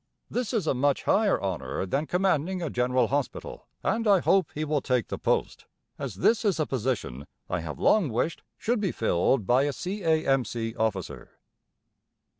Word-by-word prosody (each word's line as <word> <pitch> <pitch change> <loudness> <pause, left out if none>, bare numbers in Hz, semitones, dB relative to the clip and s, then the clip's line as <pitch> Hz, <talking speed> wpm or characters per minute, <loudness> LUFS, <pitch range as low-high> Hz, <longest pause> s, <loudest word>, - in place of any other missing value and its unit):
This 245 -3 -1
is 220 -8 0
a - - +2
much 140 +2 +1
higher 210 -1 +3
honour 95 -1 -3
than 140 +10 -1
commanding 185 -1 +1
a 165 -4 -3
General 125 -1 +1
Hospital, 140 0 -3 0.2
and 225 0 0
I 200 -2 +6
hope 190 0 +3
he 155 +1 -2
will 150 -2 0
take 125 -6 0
the - - -4
post, - - -1 0.3
as 135 -8 -4
this 220 - +2
is 200 -6 +1
a 155 - +2
position 115 - -3 0.2
I 90 - -1
have 75 -4 -6
long 205 -9 +3
wished 125 +8 -1 0.2
should 240 0 0
be 195 -4 0
filled 110 +2 +1
by 125 +6 +4
a 145 - -1
C.A.M.C. 135 - 0
officer. 105 -5 -3
140 Hz, 170 wpm, -27 LUFS, 115-185 Hz, 0.3 s, I